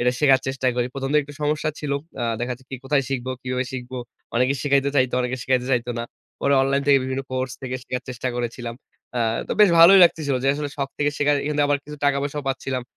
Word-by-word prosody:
এটা 125 +1 +3
শেখার 135 -3 +5
চেষ্টা 135 -1 -2
করি। 120 - +1
১ম 135 0 -3
দিকে 150 - +4
একটু 145 +1 -11
সমস্যা 155 +1 0
ছিল। 145 -2 -2 0.3
আ - - -1 0.2
দেখা 120 +1 -1
যাচ্ছে 125 +1 -10
কি 135 - -4
কোথায় 140 0 +2
শিখবো 130 -2 -3
কিভাবে 130 0 -2
শিখবো। 130 0 -6 0.4
অনেকে 125 +3 +2
শিখাইতে 140 -1 +2
চাইতো 130 -2 +2
অনেকে 125 +1 -2
শিখাইতে 130 -1 0
চাইতো 120 0 -2
না। 115 - -3 0.4
পরে 140 0 +4
অনলাইন 140 +1 +1
থেকে 140 -1 +6
বিভিন্ন 130 +1 -2
কোর্স 130 -1 -2
থেকে 130 0 -3
শিখার 125 0 -4
চেষ্টা 125 0 -3
করেছিলাম। 120 0 -4 0.4
আ - - +1 0.3
তো - - 0
বেশ 205 -4 +7
ভালোই 185 +4 +9
লাগতেছিল 150 -5 +1
যে 135 - +3
আসলে 145 0 -3
শখ 140 -1 -2
থেকে 145 0 +2
শেখা 145 0 +3
এখান 150 +1 -1
থেকে 145 - +3
আবার 145 -1 +2
কিছু 150 +1 -9
টাকা-পয়সাও 145 +1 0
পাচ্ছিলাম। 130 -1 -2
135 Hz, 225 wpm, -23 LUFS, 125-145 Hz, 0.4 s, ভালোই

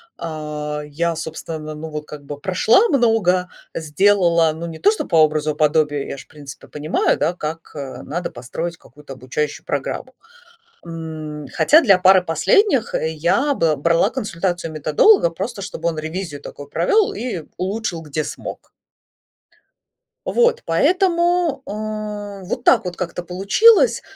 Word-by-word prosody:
А, 150 -2 -5
я, 165 +3 -2
собственно, 160 -1 -6
ну, 155 +1 -7
вот, 150 -1 -6
как 150 -1 -10
бы 145 0 -8
прошла 220 - +3
много, 225 - +2 0.2
сделала, 170 0 +3
ну, 165 +2 -6
не 165 -1 -7
то 200 +6 +4
что 220 - -3
по - - -2
образу 155 0 +1
и - - -20
подобию, 150 -2 +2
я - - -6
ж, 130 - -11
в - - -42
принципе, 145 -3 -12
понимаю, 150 +1 0
да, 160 +4 0
как, 165 -1 -6
э, 135 -4 -7
надо 175 +4 -4
построить 165 +8 -6
какую-то 145 +1 -13
обучающую 135 +4 -4
программу. 200 - -4 0.7
М, 155 -3 -7
хотя 310 - +5
для 200 - +5
пары 185 0 +6
последних 275 - +2
я 170 - +1
бл 160 - +1
брала 170 +7 +2
консультацию 175 -8 -3
методолога, 155 - +4
просто 200 +5 -5
чтобы 170 -4 -3
он 165 - -3
ревизию 160 -2 -5
такую 145 - -9
провел 405 - +2
и 235 - -4
улучшил 190 -2 -3
где 155 0 -3
смог. - - -8 1.6
Вот, 485 0 +2
поэтому, 350 -5 +2
э, 210 -2 -5
вот 240 +4 -3
так - - +4
вот 180 -1 -4
как-то 175 0 -4
получилось. 195 - +4
170 Hz, 145 wpm, -20 LUFS, 155-205 Hz, 1.6 s, пары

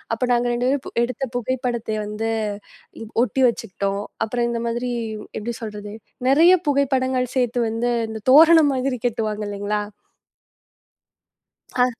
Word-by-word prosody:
அப்ப 225 - -18
நாங்க 240 0 +1
2 245 +1 0
பேரும் 275 -3 -3
எடுத்த 250 +2 -3
புகைப்படத்தை 245 -3 -2
வந்து, 215 +2 -3 0.9
ஒட்டி 265 +1 -1
ப் - - +7
வச்சுக்கிட்டோம். 200 -3 -3 0.2
அப்புறம் 235 +2 -1
இந்த 235 -1 -2
மாதிரி 240 +2 -2 0.5
எப்படி 235 +3 -4
சொல்றது? 210 -2 -7 0.4
நிறைய 320 +6 +6 0.2
புகைப்படங்கள் 260 -2 +1
சேர்த்து 245 -1 +1
வந்து 230 +2 -1 0.2
இந்த 220 0 -6
தோரணை 320 +2 +8
மாதிரி 260 -1 -1
கட்டுவாங்க 215 -2 -2
இல்லீங்களா? 205 +1 -2 1.9
அ 250 - +4
240 Hz, 125 wpm, -22 LUFS, 220-260 Hz, 1.9 s, தோரணை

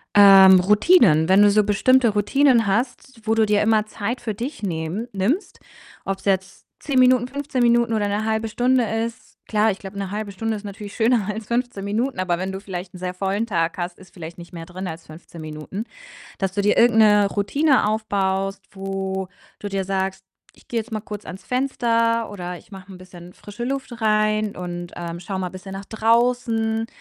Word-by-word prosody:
Ähm, 195 -2 +9
Routinen? 195 - +4
Wenn 190 +2 +6
du 205 - +7
so 210 +1 +4
bestimmte 235 +5 +3
Routinen 230 +4 +3
hast, 245 +3 -2
wo 220 - +2
du 220 -1 +3
dir 210 -1 +2
immer 215 0 +2
Zeit 215 +3 -4
für 225 -3 -3
dich 235 +2 -6
nehmen 175 +4 -3
nimmst, 220 - -2 0.5
ob's 195 0 -4
jetzt 190 -1 -1
10 275 -3 0
Minuten, 250 -1 +4
15 280 -1 -3
Minuten 235 -1 +3
oder 210 -2 0
'ne 205 +2 -1
1/2 220 0 -1
Stunde 245 +3 +2
ist. 225 +1 -4
Klar, 215 0 +2
ich 195 - -7
glaube, 195 0 -9
'ne 195 -1 -4
1/2 210 0 -4
Stunde 225 +3 -3
ist 210 - -8
natürlich 205 0 -8
schöner 230 -3 +2
als 215 0 -5
15 240 -4 -2
Minuten, 220 +3 -2
aber 180 -2 0
wenn 185 +2 -3
du 190 - -5
vielleicht 185 -2 -7
'n - - -9
sehr 180 0 -4
vollen 195 +4 -1
Tag 170 -5 -1
hast, 175 0 -4
ist 190 - -17
vielleicht 165 -1 -9
nicht 170 0 -12
mehr 165 -1 -7
drin 185 +2 -7
als 165 -1 -8
15 160 +1 -12
Minuten. 155 +7 -6 0.5
Dass 195 -1 -1
du 200 +1 -1
dir 205 - +2
irgend 235 -1 +5
'ne 210 -2 +5
Routine 255 +6 +2
aufbaust, 195 -2 -1
wo 190 -1 -4 0.3
du 205 - -5
dir 195 -1 -2
sagst: 190 0 -2 0.3
„Ich - - -23
gehe 235 - -1
jetzt 225 +2 -10
mal 215 - -2
kurz 210 -1 -8
ans 190 - -9
Fenster“ 230 -3 0
oder 180 -3 -6
„ich - - -17
mache 190 -1 -12
'n 190 - -10
bisschen 180 -1 -13
frische 210 +3 -8
Luft 260 -2 -4
rein 215 -1 +1
und, 175 -1 -6
ähm, 170 0 -6
schau 190 +2 -5
mal 185 -1 -3
bisschen 185 +1 -10
nach 195 +1 -7
draußen.“ 225 0 +1
205 Hz, 200 wpm, -22 LUFS, 190-230 Hz, 0.5 s, Ähm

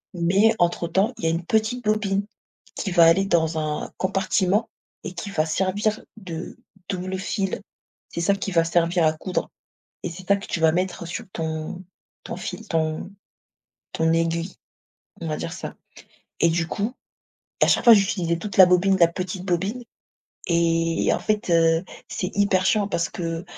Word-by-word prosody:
Mais 195 +6 +3
entre 175 0 +1
temps, 195 +8 +1
il - - -3
y - - +3
a - - +3
une 165 +1 -2
petite 220 +5 0
bobine 205 -2 +1 0.5
qui 200 - -3
va 175 -1 +6
aller 175 +4 +5
dans 160 -4 +1
un 150 -1 -3
compartiment 190 +2 +1 0.4
et - - -6
qui 200 - -6
va 155 -4 +1
servir 195 +6 0 0.2
de 175 -6 -7 0.3
double 185 0 -3
fil. 195 0 -2 0.5
C'est 170 - -4
ça 185 +4 +3
qui 195 0 -4
va 165 -2 +4
servir 170 +1 +2
à 155 - +3
coudre 180 +3 -3 0.6
et - - -2
c'est 180 +2 -10
ça 200 - +5
que 200 - -8
tu 170 - -3
vas 160 0 +5
mettre 180 +1 -2
sur 225 +7 -5
ton 160 +2 -4 0.4
ton - - -5
fil 225 -2 -7
ton 160 +2 -1 0.8
ton 160 0 +2
aiguille, 165 +2 -1 0.7
on 165 - -4
va 155 - -1
dire 165 - -4
ça. - - -6 0.7
Et 170 - +5
du 165 0 0
coup, 205 +7 -2 0.7
à - - +7
chaque - - +3
fois 235 - +10
j'utilisais 185 -4 +1
toute 200 +3 -6
la 190 - +10
bobine 180 +2 +3
de - - -8
la 170 - +7
petite 185 +1 -5
bobine 195 +7 -1 0.6
et 165 -1 +2
en - - 0
fait, 215 -3 -1
heu, 165 +1 +4 0.2
c'est 185 - -3
hyper 200 -2 +2
chiant 205 -2 +2
parce 170 -5 -1
que 165 0 -4
180 Hz, 180 wpm, -24 LUFS, 165-195 Hz, 0.8 s, fois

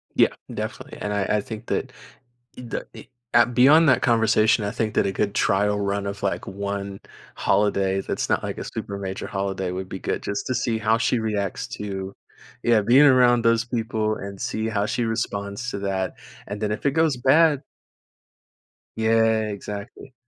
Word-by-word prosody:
Yeah. - - +5 0.2
Definitely, - - -6
and 105 - -3
I 100 -1 0
I - - 0
think 110 +1 -8
that - - -2 0.7
e - - -7
da 120 - -4
eh - - -9 0.3
ah 120 - +7
beyond 140 +7 +5
that - - +4
conversation, 110 -1 +3
I 100 - -2
think 110 0 -2
that - - +3
a 100 - 0
good 100 +1 -1
trial 105 +1 +2
run 100 0 -1
of, 100 0 -5
like, 100 - -1
1 100 0 -4 0.4
holiday 95 -2 +1
that's - - -3
not - - +1
like - - -4
a - - -4
super 100 - -5
major 95 -1 -5
holiday 95 -2 -2
would 95 +1 -5
be 95 - -6
good - - -2
just 100 0 -3
to 130 - -1
see 115 -2 0
how 110 +1 +2
she 125 +1 +1
reacts 105 -4 -2
to 95 -2 -5 0.5
yeah, 115 -3 +4
being 125 +7 +6
around 125 -3 +5
those 115 0 +3
people 110 -2 -1
and 100 0 -8
see 110 +1 -2
how 105 -2 0
she 120 - -1
responds 110 0 -3
to - - -4
that, 95 -2 -2 0.3
and 100 +1 -5
then 105 -1 0
if - - -7
it 140 - +4
goes 160 -4 +2
bad 145 +3 +4 1.4
Yeah, 110 -1 +2
exactly. 105 +5 -8
105 Hz, 185 wpm, -24 LUFS, 100-115 Hz, 1.4 s, ah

